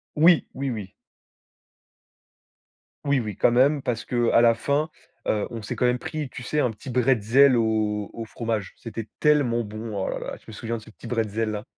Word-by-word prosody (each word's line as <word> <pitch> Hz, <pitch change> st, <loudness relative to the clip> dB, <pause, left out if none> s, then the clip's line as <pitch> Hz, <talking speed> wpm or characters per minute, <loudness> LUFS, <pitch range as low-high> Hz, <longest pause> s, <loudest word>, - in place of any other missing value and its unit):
Oui, 165 Hz, +2 st, +5 dB
oui, 135 Hz, 0 st, -2 dB
oui. 105 Hz, -5 st, -5 dB, 2.1 s
Oui, 140 Hz, -1 st, +2 dB
oui, 110 Hz, -5 st, -3 dB
quand -, -, +4 dB
même, 135 Hz, +4 st, +3 dB
parce 115 Hz, -3 st, -2 dB
qu'à 120 Hz, -1 st, +3 dB
la 115 Hz, -1 st, +6 dB
fin, 145 Hz, +6 st, 0 dB, 0.4 s
heu, 105 Hz, -1 st, 0 dB
on 115 Hz, -, -5 dB
s'est 105 Hz, -, -5 dB
quand 125 Hz, -, +1 dB
même 125 Hz, 0 st, +2 dB
pris, 155 Hz, -2 st, -5 dB
tu 125 Hz, -, -8 dB
sais, 150 Hz, +4 st, 0 dB
un 125 Hz, -, +2 dB
petit 110 Hz, +5 st, -11 dB
bretzel 125 Hz, +1 st, +4 dB
au 110 Hz, -2 st, 0 dB
au 115 Hz, -, -6 dB
fromage. 110 Hz, -4 st, -3 dB
C'était 115 Hz, -1 st, -7 dB
tellement 140 Hz, -6 st, +3 dB
bon. 110 Hz, +1 st, -6 dB
Oh 95 Hz, -, -1 dB
là -, -, -3 dB
la! -, -, -5 dB
Je -, -, -22 dB
me -, -, -10 dB
souviens 115 Hz, +2 st, -4 dB
de 110 Hz, -, -9 dB
ce 110 Hz, -, -14 dB
petit 115 Hz, -, -11 dB
bretzel, 110 Hz, -2 st, -1 dB
là. 105 Hz, 0 st, -4 dB
115 Hz, 200 wpm, -25 LUFS, 110-130 Hz, 2.1 s, la